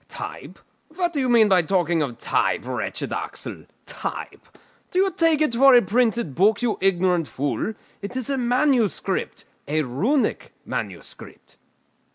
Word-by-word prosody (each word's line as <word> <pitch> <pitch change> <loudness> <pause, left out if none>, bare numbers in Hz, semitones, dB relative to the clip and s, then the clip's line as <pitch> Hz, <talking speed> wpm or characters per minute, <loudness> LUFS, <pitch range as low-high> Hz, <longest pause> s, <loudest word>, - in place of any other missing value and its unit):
"Type! - - -8 0.4
What 350 -1 -1
do 290 - -1
you 260 -2 0
mean 230 -3 +6
by 190 -3 +5
talking 175 -1 +1
of 125 -6 -3
type, - - 0
wretched - - -4
Axel? - - -6 0.2
Type! - - -7 0.4
Do - - -4
you 385 +1 +3
take 325 -3 +2
it 300 - 0
for 265 +2 +6
a 240 - +7
printed 225 - +1
book, 205 - +2
you 235 -3 0
ignorant 180 -3 +2
fool? 145 +10 -2 0.3
It 200 +5 -7
is 255 - -4
a 280 - -1
manuscript, 245 -6 0 0.2
a 155 +2 0
Runic 200 - -1
manuscript." - - -8
220 Hz, 150 wpm, -23 LUFS, 180-260 Hz, 0.4 s, a